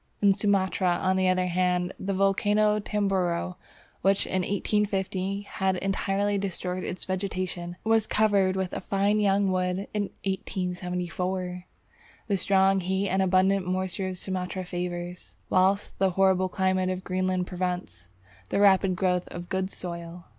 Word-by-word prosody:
In 200 -1 +5
Sumatra, 190 -3 +1
on 185 0 +1
the 185 0 +3
other 185 0 +2
hand, 180 0 0
the 195 0 -2
volcano 205 +2 +3
of 210 - -5
Tamboro, 185 -4 0 0.4
which 195 +1 +2
in 185 - 0
1815 195 0 -1
had 190 -2 -1
entirely 195 +1 0
destroyed 185 -1 -3
its 180 - -5
vegetation, 185 -2 -3
was 225 -1 +2
covered 200 -3 +3
with 190 -1 -2
a - - -3
fine 200 +2 +1
young 200 -1 +3
wood 185 +1 -1
in 205 -2 -1 0.2
1874! 180 -1 -3 0.6
The 200 -2 +1
strong 195 +1 +3
heat 190 +2 -1
and 190 +1 +2
abundant 190 0 +3
moisture 185 +1 -1
of 185 -1 -4
Sumatra 185 0 -3
favours, 175 0 -5 0.2
whilst 190 +2 +2
the 195 0 +4
horrible 185 0 +3
climate 185 0 +1
of 185 0 -3
Greenland 185 -1 0
prevents, 180 - -4 0.4
the - - 0
rapid 195 -2 +5
growth 180 -1 0
of 175 0 -8
good 190 0 -1
soil. 170 -2 -7
185 Hz, 145 wpm, -27 LUFS, 180-195 Hz, 0.6 s, In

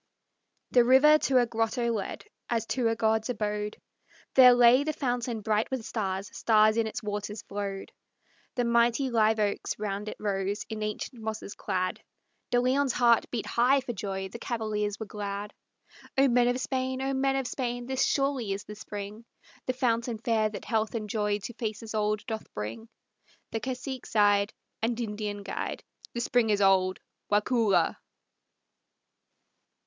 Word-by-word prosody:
The 245 - +6
river 275 +5 +6
to 265 -3 +2
a 245 - +5
grotto 230 +1 0
led, 215 - -4 0.2
as 230 -2 0
to 250 -3 +1
a 225 - +1
god's 220 +1 +1
abode; 210 -2 -2 0.6
There 255 -2 +9
lay 245 +3 +6
the 310 +1 -1
fountain 245 -5 -2
bright 215 +1 +1
with 260 -4 -3
stars; 195 -3 -3
stars 215 -1 +4
in 225 -1 +1
its 220 - -5
waters 210 0 -4
flowed; 200 -1 -5 0.6
The 245 - +1
mighty 235 +3 +2
live 220 -1 +3
oaks 205 -1 -1
round 205 0 -3
it - - -8
rose, 200 0 -2
in 215 -1 -4
ancient 215 +3 -4
mosses 220 -2 -5
clad; 185 -2 -2 0.5
De 245 - +3
Leon's 260 +1 +2
heart 235 -2 +4
beat 235 -3 -3
high 255 +4 +3
for 250 -2 -5
joy; 190 -2 -4
the 235 +5 -9
cavaliers 215 -3 -2
were 220 - -4
glad, 205 0 -5 0.6
"O 275 +1 +6
men 245 -1 +4
of 245 +1 +1
Spain! 260 0 -2
O 270 0 0
men 270 0 +1
of 270 -1 -1
Spain! 245 -1 -3
This 265 +1 0
surely 275 -7 +1
is 195 - -5
the 210 - -9
spring, 205 +1 -7 0.4
The 255 - +1
fountain 235 -2 0
fair 220 -1 +1
that 210 - -8
health 220 0 0
and 215 -2 -3
joy 210 -1 0
to 240 - -5
faces 220 -1 -5
old 210 0 0
doth 220 -3 -5
bring!" 110 - -5 0.6
The 225 - -1
cacique 255 +1 -5
sighed, 205 -1 +3 0.3
And 230 +1 0
Indian 210 -2 -4
guide, 195 - -4 0.3
"The 235 - -1
spring 240 -1 +2
is 205 -1 +2
old, 190 -1 +3 0.3
Waukulla!" 205 -4 +2
225 Hz, 165 wpm, -28 LUFS, 210-245 Hz, 0.6 s, There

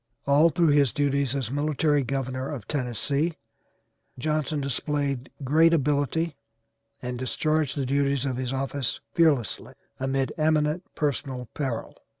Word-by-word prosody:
All 145 +4 +5
through 165 +1 +3
his 145 -4 +4
duties 140 -2 +1
as 130 -4 -2
military 145 +1 +2
governor 130 0 -2
of 130 -9 -6
Tennessee 140 +4 -1 0.8
Johnson 150 +2 -1
displayed 140 -1 -2
great 160 +5 +5
ability 150 +2 0 0.7
and 125 0 -4
discharged 155 +3 0
the 135 - 0
duties 140 0 +1
of 130 -2 -1
his 130 -1 -2
office 135 -1 -2
fearlessly, 150 -9 +2 0.2
amid 135 -1 0
eminent 155 +2 +2
personal 135 -4 -2
peril. 130 -6 -3
140 Hz, 125 wpm, -26 LUFS, 130-150 Hz, 0.8 s, All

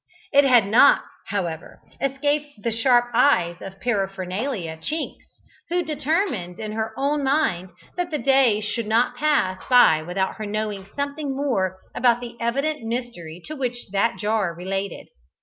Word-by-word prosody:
It 285 0 +6
had 245 -6 +5
not, 215 +5 +6 0.2
however, 175 -5 -4 0.2
escaped 285 -2 -1
the 230 - 0
sharp 240 +1 +3
eyes 230 -9 +3
of 195 0 -9
Paraphernalia 195 -3 -2
Chinks, 305 - -6 0.3
who 350 +1 +1
determined 295 - -1
in 215 -1 -4
her 220 0 -2
own 285 +1 0
mind 265 - +1 0.3
that 355 -1 -1
the 305 - -1
day 265 -6 +3
should 215 +1 -3
not 230 +3 +2
pass 245 -11 +1
by 245 -11 +6
without 180 +4 -2
her 215 - -5
knowing 205 -2 -3
something 285 0 -3
more 195 -10 0 0.2
about 240 -1 +3
the 240 -1 -8
evident 275 +6 -1
mystery 225 -8 -5
to 310 - -6
which 245 -5 -4
that 200 +4 +1
jar 210 -5 0
related. 195 +2 -4
230 Hz, 150 wpm, -23 LUFS, 195-275 Hz, 0.3 s, It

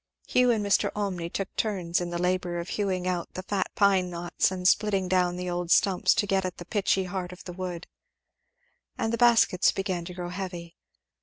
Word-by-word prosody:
Hugh 250 0 +3
and 220 -3 +1
Mr. 200 - +2
Olmney 185 -5 -2
took 195 +2 -4
turns 180 -5 -1
in 175 - -3
the 175 - -3
labour 180 0 -1
of 170 +1 -5
hewing 185 -3 -1
out 180 -2 -3
the 185 - -5
fat 195 0 -1
pine 195 -3 +3
knots 175 0 0
and 185 -1 -1
splitting 195 -2 +2
down 180 -1 +2
the 180 0 -4
old 175 -1 -3
stumps 185 +1 +4
to - - +1
get 195 -1 +1
at 185 -1 -4
the 175 - -9
pitchy 195 0 +1
heart 180 -1 -4
of 180 - -11
the 180 - -8
wood; 175 -1 -5 1.1
and 225 +1 -1
the - - +1
baskets 230 -6 +5
began 190 -3 -3
to 180 0 -8
grow 175 -1 -5
heavy. 180 -2 -6
185 Hz, 205 wpm, -27 LUFS, 175-195 Hz, 1.1 s, baskets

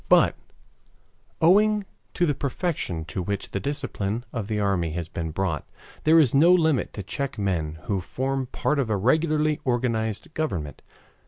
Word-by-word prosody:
But, - - +5 1.1
owing 205 +4 +4 0.3
to 175 - +3
the 150 - +2
perfection 140 - -2
to 90 - -4
which 100 +2 -3
the 100 - -1
discipline 120 -5 -3
of 115 -5 -3
the 105 -1 -1
army 95 -6 0
has 85 -1 -3
been 80 -1 -4
brought, 80 -2 -2 0.4
there 160 +2 +6
is 140 -7 +4
no 160 +6 +6
limit 160 -6 +3
to 100 - -5
check 140 +8 -4
men 85 -6 -1
who 100 -3 -1
form 130 +6 -2
part 150 +3 -1
of 130 -5 0
a 105 - +1
regularly 155 - +2
organized 115 -1 -1
government. 85 - -3
120 Hz, 160 wpm, -25 LUFS, 95-150 Hz, 1.1 s, there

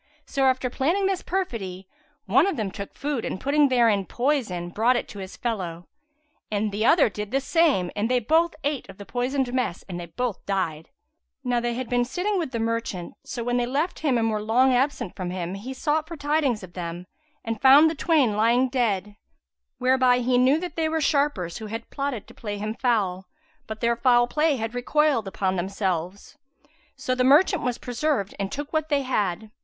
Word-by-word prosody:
So 270 -1 0
after 260 -1 +2
planning 335 +11 +1
this 385 -1 0
perfidy, 195 - -4 0.4
one 260 - +4
of 390 - -1
them 210 -4 -2
took 200 0 -8
food 285 -4 -2
and - - -4
putting 285 +3 +3
therein 230 -6 +3
poison, 240 -10 -1
brought 230 +7 +2
it - - -2
to 205 - -9
his 190 0 -8
fellow; 180 -8 -3 0.6
the 210 0 -1
other 315 +6 +5
did 210 -1 -5
the 270 +4 +1
same 275 - +2
and 210 +3 -1
they 250 - +3
both 320 +8 +2
ate 285 -2 -2
of - - -11
the 200 - -9
poisoned 250 +2 -1
mess 250 -9 -1
and 180 -2 -5
they 170 - -7
both 225 +5 -3
died. 165 -6 -2 0.5
Now 245 -1 +1
they 240 0 -2
had 255 0 -4
been 245 0 +1
sitting 365 +10 -1
with 325 - -2
the 245 - -4
merchant; 225 -6 -3
so 235 - -5
when 245 +1 0
they 240 -1 0
left 295 +8 -1
him 280 -6 +1
and 225 -1 +1
were 215 -1 -1
long 250 +5 +3
absent 250 -5 0
from 185 -2 -4
him, 180 0 -4
he 205 +7 -6
sought 300 +3 -1
for 335 0 -7
tidings 290 -7 0
of 180 -2 -11
them 175 0 -6 0.4
and 225 -2 -3
found 275 +4 +8
the 320 - 0
twain 290 -9 +2
lying 235 +4 +3
dead; 210 -6 -1 0.6
whereby 255 0 +3
he 250 0 +2
knew 265 +5 +4
that 360 +1 -6
they 320 -1 0
were 320 0 0
sharpers 280 - 0
who 220 - -6
had 225 +2 -7
plotted 275 -6 -3
to - - -15
play 205 -2 -5
him 215 +1 -3
foul, 200 -7 0 0.4
but 220 0 -7
their 235 0 +2
foul 240 0 +4
play 300 +4 +1
had 225 -2 -4
recoiled 255 -2 +1
upon 190 -1 -1
themselves. 190 - -3 0.6
So 260 -1 -2
the 255 0 +1
merchant 310 +7 +5
was 250 -1 -1
preserved 245 -4 -1
and 195 -1 -2
took 290 +2 -5
what 315 0 0
they 285 -2 +1
had. 210 -5 -1
245 Hz, 200 wpm, -25 LUFS, 205-280 Hz, 0.6 s, found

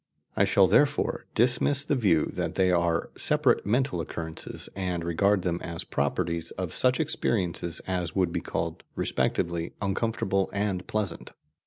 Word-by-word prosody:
I - - +4
shall - - +5
therefore - - +2
dismiss 125 +4 +3
the 150 - +1
view 95 - +3
that - - -3
they 95 -1 +3
are 85 -2 +1
separate - - +2
mental 120 -4 +1
occurrences, 80 0 -6
and 90 -3 -2
regard 100 +3 +2
them 85 -1 -1
as 85 -2 -4
properties 85 +3 -1
of 90 -4 -3
such 130 +2 +3
experiences 90 - -1
as 90 -2 -2
would 90 -3 +1
be - - -1
called - - -3
respectively 85 -1 -1
uncomfortable 100 -1 0
and 100 -3 -1
pleasant. 100 -6 -3
90 Hz, 145 wpm, -27 LUFS, 85-105 Hz, -, shall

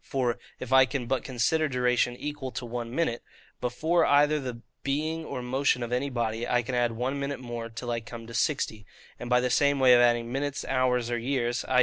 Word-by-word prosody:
For, 125 -3 -1 0.2
if 130 0 -4
I 130 -1 +7
can 125 -1 -3
but 130 0 -1
consider 140 +5 +1
duration 125 -2 +1
equal 145 -2 -5
to 130 - -4
one 120 0 -4
minute, 120 -3 -1 0.4
before 160 +8 +1
either 145 +1 +4
the 125 -3 -6 0.2
being 155 +4 -1
or 130 -5 -5
motion 130 0 +1
of 120 - -5
any 130 +3 0
body, 115 -2 -2
I 125 0 +2
can 125 +2 -5
add 120 -1 +1
one 130 +5 -2
minute 140 -1 -3
more 120 -2 -6
till 120 +2 -5
I 115 - 0
come 115 0 -9
to 115 - -10
sixty; 115 -5 0 0.4
and 120 - -6
by 125 0 +5
the 125 0 0
same 140 +2 +3
way 130 -1 +7
of 120 - +7
adding 120 -1 +2
minutes, 140 +1 -2
hours, 125 -2 +1
or 120 - 0
years 120 -1 -1
(i. 130 -1 +3
125 Hz, 220 wpm, -28 LUFS, 120-140 Hz, 0.4 s, I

